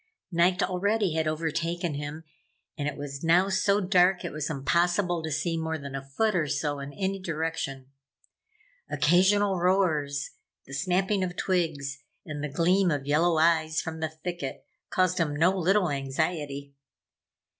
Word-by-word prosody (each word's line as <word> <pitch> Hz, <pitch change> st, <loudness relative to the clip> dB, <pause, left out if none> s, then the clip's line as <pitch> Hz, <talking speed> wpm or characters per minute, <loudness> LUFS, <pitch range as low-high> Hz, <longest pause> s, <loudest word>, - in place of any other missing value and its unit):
Night 175 Hz, +1 st, +3 dB
already 195 Hz, +1 st, +1 dB
had 160 Hz, -1 st, 0 dB
overtaken 165 Hz, +2 st, -1 dB
him 145 Hz, +2 st, -5 dB, 0.5 s
and 145 Hz, -2 st, -3 dB
it 150 Hz, -, -3 dB
was 140 Hz, 0 st, -6 dB
now 175 Hz, +4 st, +4 dB
so 200 Hz, +1 st, +2 dB
dark, 185 Hz, -1 st, +3 dB
it 175 Hz, -, -3 dB
was 150 Hz, 0 st, -3 dB
impossible 175 Hz, +4 st, +1 dB
to 160 Hz, -, -4 dB
see 155 Hz, +3 st, -1 dB
more 160 Hz, 0 st, -2 dB
than 140 Hz, -2 st, -8 dB
a 135 Hz, -, -3 dB
foot 200 Hz, +10 st, 0 dB
or 160 Hz, -4 st, +1 dB
so 145 Hz, 0 st, -1 dB
in 140 Hz, +1 st, -6 dB
any 195 Hz, +2 st, -2 dB
direction. 160 Hz, -6 st, -3 dB, 1.0 s
Occasional 190 Hz, +3 st, +3 dB
roars, 160 Hz, -7 st, +1 dB, 0.3 s
the 135 Hz, -, -11 dB
snapping 185 Hz, +6 st, +1 dB
of 180 Hz, -1 st, -3 dB
twigs 155 Hz, -8 st, -1 dB, 0.3 s
and 150 Hz, -2 st, -5 dB
the 150 Hz, -, -2 dB
gleam 180 Hz, +5 st, +3 dB
of 145 Hz, -4 st, -1 dB
yellow 160 Hz, +3 st, +3 dB
eyes 160 Hz, -1 st, +3 dB
from 160 Hz, 0 st, -5 dB
the 160 Hz, 0 st, -1 dB
thicket, 160 Hz, -2 st, -6 dB, 0.2 s
caused 185 Hz, -1 st, +1 dB
him 150 Hz, -3 st, 0 dB
no 175 Hz, +6 st, +3 dB
little 185 Hz, -1 st, +2 dB
anxiety. 140 Hz, 0 st, -2 dB
165 Hz, 155 wpm, -27 LUFS, 145-180 Hz, 1.0 s, now